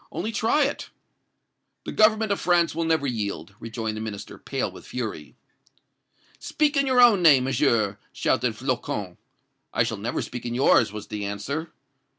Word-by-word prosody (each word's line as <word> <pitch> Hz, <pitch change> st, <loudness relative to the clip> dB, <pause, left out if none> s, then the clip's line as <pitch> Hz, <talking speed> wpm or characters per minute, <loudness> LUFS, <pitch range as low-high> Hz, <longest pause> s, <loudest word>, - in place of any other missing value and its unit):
'Only 215 Hz, +6 st, -3 dB
try 225 Hz, +7 st, +2 dB
it!' 285 Hz, -, -4 dB, 0.9 s
"'The -, -, -5 dB
Government 215 Hz, 0 st, +3 dB
of 200 Hz, -, 0 dB
France 175 Hz, -1 st, +2 dB
will 165 Hz, +1 st, -2 dB
never 160 Hz, -3 st, +1 dB
yield!' 105 Hz, -5 st, -3 dB
rejoined 115 Hz, -1 st, -4 dB
the 110 Hz, -, -5 dB
Minister, 105 Hz, -2 st, -7 dB
pale -, -, -3 dB
with -, -, -12 dB
fury. 110 Hz, -, -5 dB, 1.0 s
"'Speak 300 Hz, 0 st, 0 dB
in 275 Hz, -1 st, +2 dB
your 255 Hz, -1 st, +3 dB
own 235 Hz, -6 st, +7 dB
name, 145 Hz, -6 st, +6 dB
Monsieur!' 115 Hz, -6 st, +1 dB
shouted 115 Hz, -1 st, 0 dB
Flocon. 120 Hz, -7 st, -3 dB, 0.6 s
"'I -, -, +4 dB
shall -, -, -3 dB
never -, -, -3 dB
speak 125 Hz, -, -7 dB
in 120 Hz, -, -3 dB
yours!' 120 Hz, -4 st, +4 dB
was 105 Hz, -1 st, -7 dB
the 105 Hz, -1 st, -4 dB
answer. 140 Hz, +11 st, -4 dB
130 Hz, 165 wpm, -25 LUFS, 110-180 Hz, 1.0 s, own